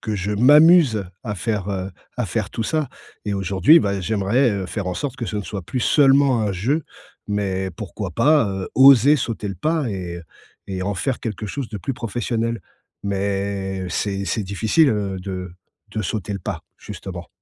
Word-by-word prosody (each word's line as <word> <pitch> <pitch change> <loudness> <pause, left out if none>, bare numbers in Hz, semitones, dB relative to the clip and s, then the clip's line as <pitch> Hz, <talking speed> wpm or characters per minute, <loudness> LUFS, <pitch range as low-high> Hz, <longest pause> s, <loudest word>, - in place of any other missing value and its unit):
que 110 - -3
je 100 +2 -2
m'amuse 145 - +6 0.2
à 105 -2 -3
faire, 105 -1 -2
heu, 95 0 -3 0.3
à 125 -3 -1
faire 100 +1 -2
tout 115 - -3
ça 155 +2 -1 0.4
et 105 -1 -1
aujourd'hui, 95 - +5
bah, 100 -4 -1
j'aimerais, 110 +6 +1
heu, 100 -3 -2
faire 100 +2 -4
en 90 - -2
sorte 140 +4 -3
que 120 -4 -4
ce 105 - -4
ne 105 - -2
soit 100 -1 -6
plus 125 +9 -4
seulement 135 -3 +4
un 105 -2 0
jeu 125 - 0 0.5
mais 95 -2 -1
pourquoi 100 +1 -6
pas, 145 - +4
heu, 95 -1 -4
oser 135 +2 +7
sauter 115 -5 -3
le 100 - -4
pas? 155 - 0
Et 90 -3 -5
heu 85 - -9 0.5
et 95 -1 -3
en 100 +2 -2
faire 130 +5 -2
quelque 105 -2 -4
chose 135 +3 -4
de 105 -2 -6
plus 135 - -4
professionnel. 115 0 -2 0.4
Mais 100 -1 -2
c'est 100 +2 -2
c'est 100 +4 -1
difficile, 110 - +2
heu, 100 -3 -2
de 90 -1 -6 0.4
de 110 0 -2
sauter 105 +1 -3
le 100 - -4
pas, - - -5 0.2
justement. 90 -4 -8
105 Hz, 190 wpm, -21 LUFS, 95-120 Hz, 0.5 s, oser